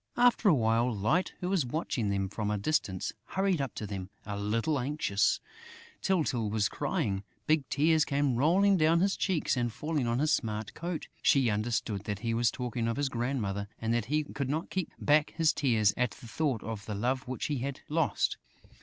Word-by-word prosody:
After 240 Hz, -3 st, +5 dB
a -, -, +6 dB
while, 115 Hz, 0 st, +2 dB
Light, 120 Hz, -, +1 dB
who 180 Hz, -, -1 dB
was 190 Hz, -5 st, +2 dB
watching 125 Hz, -4 st, -2 dB
them 100 Hz, -1 st, 0 dB
from 105 Hz, +2 st, -3 dB
a 105 Hz, -, 0 dB
distance, 100 Hz, -5 st, -1 dB
hurried 190 Hz, -2 st, 0 dB
up 135 Hz, -4 st, -4 dB
to 105 Hz, -, -4 dB
them 95 Hz, -2 st, -5 dB, 0.2 s
a 100 Hz, 0 st, -4 dB
little 115 Hz, +9 st, 0 dB
anxiously: 125 Hz, -7 st, +1 dB, 0.6 s
Tyltyl 145 Hz, -, +1 dB
was 105 Hz, -1 st, +1 dB
crying! 95 Hz, -2 st, -1 dB, 0.2 s
Big 155 Hz, -3 st, +1 dB
tears 155 Hz, +1 st, +3 dB
came 140 Hz, -3 st, +1 dB
rolling 185 Hz, +9 st, +4 dB
down 165 Hz, +1 st, +4 dB
his 195 Hz, +1 st, +2 dB
cheeks 180 Hz, -8 st, 0 dB
and 120 Hz, -2 st, 0 dB
falling 150 Hz, +1 st, -2 dB
on 115 Hz, 0 st, +1 dB
his 150 Hz, +3 st, +2 dB
smart 110 Hz, -2 st, -2 dB
coat. 170 Hz, -1 st, -4 dB
She 130 Hz, -5 st, +4 dB
understood 105 Hz, -1 st, -1 dB
that 105 Hz, -1 st, -3 dB
he 115 Hz, -, +1 dB
was 115 Hz, 0 st, +3 dB
talking 120 Hz, -1 st, -3 dB
of 115 Hz, -, -1 dB
his 145 Hz, -1 st, 0 dB
grandmother 115 Hz, -6 st, -2 dB
and 115 Hz, 0 st, 0 dB
that 120 Hz, -2 st, 0 dB
he 150 Hz, +5 st, +1 dB
could 140 Hz, -2 st, -4 dB
not 155 Hz, +4 st, -2 dB
keep 185 Hz, -3 st, -2 dB
back 150 Hz, +1 st, +3 dB
his 160 Hz, -2 st, +4 dB
tears 110 Hz, -7 st, +3 dB
at 125 Hz, -1 st, +1 dB
the 120 Hz, -, -13 dB
thought 130 Hz, -2 st, -1 dB
of 110 Hz, -2 st, -6 dB
the 105 Hz, -, -3 dB
love 125 Hz, +5 st, -1 dB
which 130 Hz, 0 st, -3 dB
he 145 Hz, -3 st, -1 dB
had 135 Hz, +2 st, -4 dB
lost. 160 Hz, 0 st, +1 dB
125 Hz, 200 wpm, -30 LUFS, 110-155 Hz, 0.6 s, a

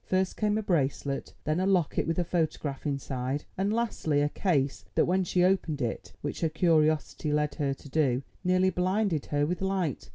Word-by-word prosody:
First 185 Hz, 0 st, 0 dB
came 210 Hz, -1 st, +1 dB
a 220 Hz, -, -1 dB
bracelet, 140 Hz, -6 st, -1 dB
then 155 Hz, +3 st, 0 dB
a 185 Hz, -, +1 dB
locket 180 Hz, -7 st, +1 dB
with 165 Hz, -, 0 dB
his 175 Hz, -, +1 dB
photograph 155 Hz, -4 st, -2 dB
inside, 135 Hz, 0 st, -2 dB
and 195 Hz, +2 st, 0 dB
lastly, 215 Hz, -10 st, 0 dB
a 145 Hz, -, +2 dB
case 145 Hz, -6 st, 0 dB
that, -, -, +4 dB
when 185 Hz, +2 st, +2 dB
she 180 Hz, 0 st, +1 dB
opened 180 Hz, -5 st, +2 dB
it, 120 Hz, -4 st, -3 dB
which 145 Hz, -, -4 dB
her 165 Hz, -, +2 dB
curiosity 155 Hz, -2 st, +2 dB
led 150 Hz, -1 st, +1 dB
her 140 Hz, -1 st, +1 dB
to 140 Hz, -, -14 dB
do, 135 Hz, -3 st, +1 dB, 0.2 s
nearly 185 Hz, +1 st, +3 dB
blinded 185 Hz, -2 st, 0 dB
her 145 Hz, 0 st, +1 dB
with 175 Hz, +4 st, -2 dB
light. 190 Hz, -7 st, -1 dB
160 Hz, 190 wpm, -29 LUFS, 145-185 Hz, 0.2 s, that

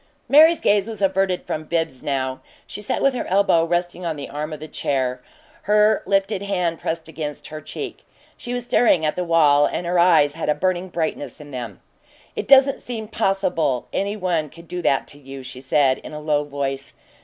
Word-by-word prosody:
Mary's 320 Hz, +4 st, +6 dB
gaze 205 Hz, 0 st, +3 dB
was 220 Hz, -3 st, -6 dB
averted 195 Hz, -2 st, +1 dB
from 155 Hz, -, -3 dB
Bibbs 160 Hz, -4 st, -2 dB
now; 130 Hz, -2 st, -2 dB, 0.2 s
she -, -, -7 dB
sat 210 Hz, -, -2 dB
with 275 Hz, -, +4 dB
her 250 Hz, -, -3 dB
elbow 190 Hz, -3 st, +3 dB
resting 175 Hz, +1 st, -2 dB
on 165 Hz, -2 st, -2 dB
the 145 Hz, -, -7 dB
arm 150 Hz, +2 st, -4 dB
of 155 Hz, -, -6 dB
the 155 Hz, -, -8 dB
chair, 130 Hz, -4 st, -2 dB, 0.5 s
her 210 Hz, 0 st, +4 dB
lifted 195 Hz, 0 st, +1 dB
hand 180 Hz, -5 st, -1 dB
pressed 165 Hz, 0 st, -3 dB
against 155 Hz, -2 st, -6 dB
her 155 Hz, 0 st, -7 dB
cheek. -, -, -7 dB, 0.4 s
She 240 Hz, -, -7 dB
was 245 Hz, 0 st, -2 dB
staring 230 Hz, -9 st, +3 dB
at 150 Hz, -, 0 dB
the 180 Hz, -, -1 dB
wall, 150 Hz, -4 st, +4 dB
and 175 Hz, -, -4 dB
her 175 Hz, +1 st, +1 dB
eyes 165 Hz, -5 st, +5 dB
had 165 Hz, -, -4 dB
a 150 Hz, -, +3 dB
burning 185 Hz, 0 st, -1 dB
brightness 155 Hz, -6 st, -3 dB
in 145 Hz, -1 st, -11 dB
them. 120 Hz, -7 st, -7 dB, 0.5 s
"It -, -, -4 dB
doesn't 275 Hz, 0 st, +6 dB
seem 220 Hz, -3 st, -6 dB
possible 185 Hz, -, 0 dB
any 200 Hz, +2 st, -1 dB
one 170 Hz, -6 st, -1 dB
could 170 Hz, +3 st, -15 dB
do 180 Hz, +1 st, -4 dB
that 135 Hz, -5 st, +1 dB
to 145 Hz, -, -11 dB
you," 135 Hz, -1 st, -9 dB
she 130 Hz, 0 st, -8 dB
said, 135 Hz, -1 st, +2 dB
in -, -, -10 dB
a 150 Hz, -, -5 dB
low 150 Hz, -1 st, 0 dB
voice. 140 Hz, -1 st, -4 dB
165 Hz, 200 wpm, -22 LUFS, 145-195 Hz, 0.5 s, Mary's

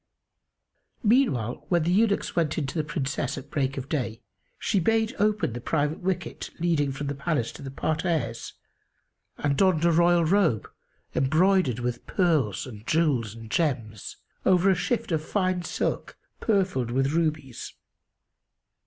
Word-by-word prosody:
Meanwhile, 205 Hz, -, +2 dB
when 175 Hz, -3 st, +3 dB
the 170 Hz, -, +1 dB
eunuchs 205 Hz, +2 st, +2 dB
went 160 Hz, -4 st, +1 dB
in 155 Hz, -, 0 dB
to 135 Hz, -, -6 dB
the 155 Hz, -, +1 dB
Princess 145 Hz, -3 st, -2 dB
at 135 Hz, -, -9 dB
break 135 Hz, -1 st, -1 dB
of 135 Hz, 0 st, -4 dB
day, 120 Hz, -7 st, -2 dB, 0.4 s
she 210 Hz, -4 st, +1 dB
bade 225 Hz, +4 st, +1 dB
open 210 Hz, -, +1 dB
the 120 Hz, -, -6 dB
private 150 Hz, +3 st, 0 dB
wicket 185 Hz, -1 st, -3 dB
leading 160 Hz, -5 st, +1 dB
from 135 Hz, +2 st, -5 dB
the 140 Hz, -, -2 dB
palace 140 Hz, -4 st, -1 dB
to -, -, -12 dB
the 135 Hz, -, -6 dB
parterres 155 Hz, -5 st, -2 dB, 0.8 s
and 145 Hz, -1 st, 0 dB
donned 180 Hz, -2 st, +3 dB
a 170 Hz, -, +5 dB
royal 170 Hz, 0 st, +4 dB
robe, 165 Hz, -, +2 dB, 0.5 s
embroidered 155 Hz, -, +3 dB
with 120 Hz, 0 st, -4 dB
pearls 155 Hz, -, +1 dB
and 110 Hz, -4 st, -11 dB
jewels 135 Hz, -10 st, +1 dB
and 115 Hz, -1 st, -10 dB
gems, 115 Hz, -, -2 dB, 0.3 s
over 185 Hz, +1 st, +4 dB
a -, -, +3 dB
shift 220 Hz, +4 st, -1 dB
of 155 Hz, -2 st, 0 dB
fine 185 Hz, 0 st, 0 dB
silk -, -, -3 dB, 0.2 s
purfled 185 Hz, -, +1 dB
with 135 Hz, +3 st, +1 dB
rubies. 155 Hz, -6 st, -2 dB
155 Hz, 150 wpm, -26 LUFS, 130-180 Hz, 0.8 s, a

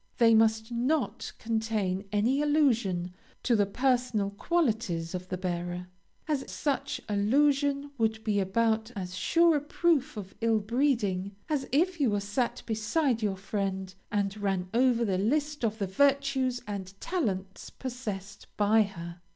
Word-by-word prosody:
They 230 Hz, -1 st, +6 dB
must 220 Hz, +1 st, +3 dB
not 250 Hz, +4 st, -1 dB
contain 220 Hz, -4 st, -1 dB
any 230 Hz, +7 st, +2 dB
allusion 230 Hz, -, +2 dB, 0.3 s
to 240 Hz, -, +3 dB
the 205 Hz, -2 st, +3 dB
personal 245 Hz, -3 st, +1 dB
qualities 215 Hz, -, 0 dB
of 180 Hz, 0 st, -5 dB
the 185 Hz, -, -2 dB
bearer, 175 Hz, 0 st, -3 dB, 0.4 s
as 295 Hz, -4 st, -1 dB
such 285 Hz, -3 st, -2 dB
allusion 280 Hz, +7 st, +2 dB
would 220 Hz, 0 st, 0 dB
be 210 Hz, -2 st, +1 dB
about 220 Hz, +3 st, +1 dB
as 185 Hz, -2 st, -5 dB
sure 335 Hz, -, +4 dB
a -, -, -2 dB
proof 295 Hz, -4 st, +1 dB
of 195 Hz, -2 st, -7 dB
ill 225 Hz, -1 st, +3 dB
breeding 210 Hz, -5 st, 0 dB
as 295 Hz, -3 st, -1 dB
if 340 Hz, +5 st, +2 dB
you 220 Hz, -8 st, +2 dB
sat 205 Hz, +5 st, -2 dB
beside 230 Hz, +3 st, 0 dB
your 200 Hz, -3 st, 0 dB
friend, 190 Hz, -1 st, -3 dB, 0.2 s
and 200 Hz, -1 st, 0 dB
ran 195 Hz, -3 st, -1 dB
over 240 Hz, -1 st, +3 dB
the 190 Hz, -3 st, 0 dB
list 290 Hz, +7 st, 0 dB
of 220 Hz, -1 st, 0 dB
the 205 Hz, -, -1 dB
virtues 265 Hz, +3 st, +1 dB
and 195 Hz, -2 st, -6 dB
talents 195 Hz, -, -3 dB
possessed 210 Hz, -6 st, -6 dB
by 215 Hz, +2 st, +4 dB
her. 175 Hz, -4 st, -5 dB
220 Hz, 145 wpm, -29 LUFS, 195-265 Hz, 0.4 s, They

